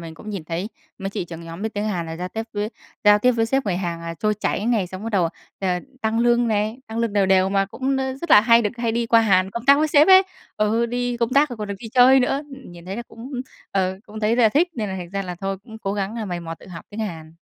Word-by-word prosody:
mình 165 -1 -8
cũng 215 +6 -9
nhìn 195 -6 -5
thấy 170 +5 -3 0.3
mấy 195 0 -4
chị 190 - -3
trưởng 165 -1 -9
nhóm 165 +3 -8
biết 220 0 -3
tiếng 205 +1 -2
Hàn 180 -6 -2
là 160 - -6
giao 180 +2 -4
tiếp 220 +4 -4
với 210 0 -2 0.4
giao 210 0 +7
tiếp 250 +4 +4
với 225 -1 +1
sếp 270 +1 0
người 185 -3 0
Hàn 170 -2 -3
là 165 0 -5
trôi 210 +6 0
chảy 210 0 -2
này, 225 -6 +1
xong 185 +2 -8
bắt 225 - -4
đầu, 180 -5 +2 0.3
ờ, 190 - 0 0.3
tăng 220 +1 0
lương 240 0 +3
này, 215 +2 0
tăng 220 +1 -5
lương 230 -2 0
đều 200 -2 +3
đều, 190 0 +4
mà 195 0 +1
cũng, 265 +7 -2
ơ, 265 0 -2
rất 340 - -6
là 210 - +9
hay 230 +1 +5
được 210 - 0
hay 230 -1 0
đi 235 +1 0
qua 230 0 +5
Hàn 190 -4 +3
công 235 +3 -6
tác 280 +1 +6
với 310 +1 +2
sếp 295 +2 +5
ấy. 380 0 +9 0.3
Ừ, 220 +3 +1
đi 245 +1 -2
công 235 -1 0
tác 285 +3 +4
rồi 245 - -7
còn 210 -1 -5
được 200 - -3
đi 225 - -8
chơi 255 +3 +6
nữa, 270 +3 0
ừm, 270 -8 -11
nhìn 170 -1 -12
thấy 190 +2 -5
là 240 - -4
cũng, 235 +3 -11 0.4
ờ, 190 -1 0
cũng 215 0 -8
thấy 220 +2 +2
là 235 -3 +5
thích 310 +11 +2
nên 215 -6 -3
là 190 - -4
thành 175 -2 -7
ra 195 +1 -2
là 180 -2 -5
thôi 195 0 -2
cũng 220 -2 -11
cố 195 -2 -3
gắng, 200 +1 -3
ờ, 225 - -3
mày 175 -3 -4
mò 165 -1 -6
tự - - -17
học 170 -2 -9
tiếng 215 +1 -6
Hàn. 165 -6 -6
210 Hz, 300 wpm, -22 LUFS, 190-235 Hz, 0.4 s, là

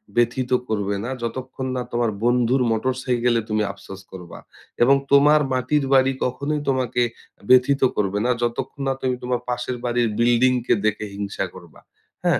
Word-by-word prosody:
ব্যথিত 120 +2 +1 0.2
করবে 100 -2 -1
না, 120 - -4
যতক্ষণ 130 +2 -5
না 125 - -1
তোমার 120 -1 +1
বন্ধুর 120 +2 +2
মোটর 115 +4 0
সাইকেলে 120 -2 +1
তুমি 110 0 +1
আফসোস 95 0 -11
করবা। 90 -2 -10 0.4
এবং 135 +3 +6 0.2
তোমার 145 +2 +6
মাটির 130 +4 +1
বাড়ি 135 0 +5
কখনোই 140 +4 -2
তোমাকে 125 -2 0 0.5
ব্যথিত 130 +2 +5
করবে 100 0 0
না, - - +1
যতক্ষণ 120 +4 -3
না 135 - +2
তুমি 130 -1 0
তোমার 125 0 -1
পাশের 125 0 -3
বাড়ির 120 -1 +1
বিল্ডিংকে 120 +1 +3
দেখে 105 0 0
হিংসা 100 -1 -3
করবা, 85 -4 -14 0.4
হ্যাঁ? - - +2
125 Hz, 155 wpm, -22 LUFS, 115-130 Hz, 0.5 s, এবং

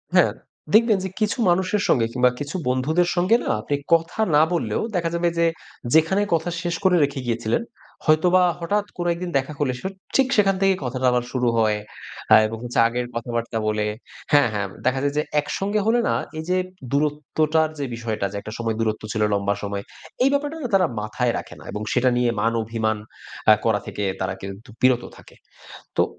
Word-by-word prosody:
হ্যাঁ। - - +5 0.4
দেখবেন 220 -1 +5
যে 190 - -3
কিছু 215 +3 0
মানুষের 190 +3 +1
সঙ্গে 115 -4 +3
কিংবা 125 0 +4
কিছু 145 +4 -5
বন্ধুদের 155 +8 +1
সঙ্গে 185 +6 +4
না - - -3
আপনি 145 - -1 0.2
কথা 165 +5 +1 0.2
না 150 - +6
বললেও 170 - -1
দেখা 170 -1 0
যাবে 170 0 +2
যে 170 - +3 0.5
যেখানে 160 +6 +4
কথা 165 +1 +1
শেষ 175 -1 -2
করে 185 -1 +4
রেখে 140 0 -1
গিয়েছিলেন, 115 - 0 0.4
হয়তোবা 180 +4 +4 0.2
হঠাৎ 205 +4 0
কোনো 175 0 -2
একদিন 175 +1 -5
দেখা 135 +3 -2
করলে 130 -3 +1 0.4
ঠিক 270 -1 +4
সেখান 195 -2 +4
থেকেই 195 -1 +3
কথাটা 130 +1 -2
আবার 125 0 +1
শুরু 125 -2 0
হয়। 110 -1 +3 0.7
এবং 115 +1 -6
হচ্ছে 120 -1 -1
আগের 120 +1 -2
কথাবার্তা 120 -1 -3
বলে 105 0 0 0.5
হ্যাঁ, 145 -1 +6
হ্যাঁ 100 -1 -1 0.2
দেখা 130 +1 +2
যায় 145 0 0
যে - - +4 0.2
একসঙ্গে 200 +7 -1
হলে 240 +2 +4
না - - +2 0.3
এই - - -4
যে 185 - +2 0.3
দূরত্বটার 155 +2 +1
যে 140 - -1
বিষয়টা 110 -4 -3
যে 100 - -5
একটা 110 - -8
সময় 115 -1 -2
দূরত্ব 110 -1 -1
ছিল 110 - -2
লম্বা 100 0 0
সময়, 100 0 -3 0.4
এই 270 - +5
ব্যাপারটা 290 +3 -1 0.2
তারা 185 -3 +4
মাথায় 120 +3 -1
রাখে - - -8
না - - -13
এবং 105 - -5
সেটা 130 0 +3
নিয়ে 120 -1 +2
মান-অভিমান 110 0 0 0.5
আ - - +10
করা 105 -2 +3
থেকে 105 - -4 0.2
তারা 95 0 -1
কিন্তু 100 +5 -8
বিরত 130 -1 +4
থাকে। - - -16 0.6
তো, - - +5
140 Hz, 185 wpm, -23 LUFS, 115-175 Hz, 0.7 s, আ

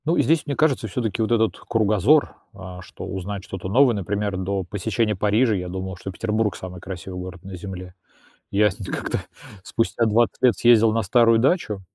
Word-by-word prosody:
Ну, 165 +3 +1
здесь, 165 0 +2
мне 140 - -2
кажется, 135 -7 +1
всё-таки 110 0 -2
вот 110 - 0
этот 115 -2 +2
кругозор, 110 - +2 0.2
а 95 -2 -9
что - - -10
узнать 95 +1 -5
что-то 95 -1 -6
новое, 125 +4 +5
например, 100 0 -2
до 95 +1 -2
посещения 105 +3 -1
Парижа, 105 +5 +2
я 90 -2 -3
думал, 95 0 -5
что 95 +2 -7
Петербург 105 0 -1
самый 90 -1 -8
красивый 90 0 -7
город 90 -1 -8
на 95 -1 -8
земле, 90 0 -8 0.6
я 105 +1 +3
сь 95 - -13
нь 100 - -6
как-то - - -3 0.4
спустя 115 +2 0
20 115 +2 +1
лет 125 -2 +4
съездил 115 -2 +5
на 115 - +1
старую 115 +3 +4
дачу, 115 - +1
105 Hz, 185 wpm, -23 LUFS, 95-115 Hz, 0.6 s, новое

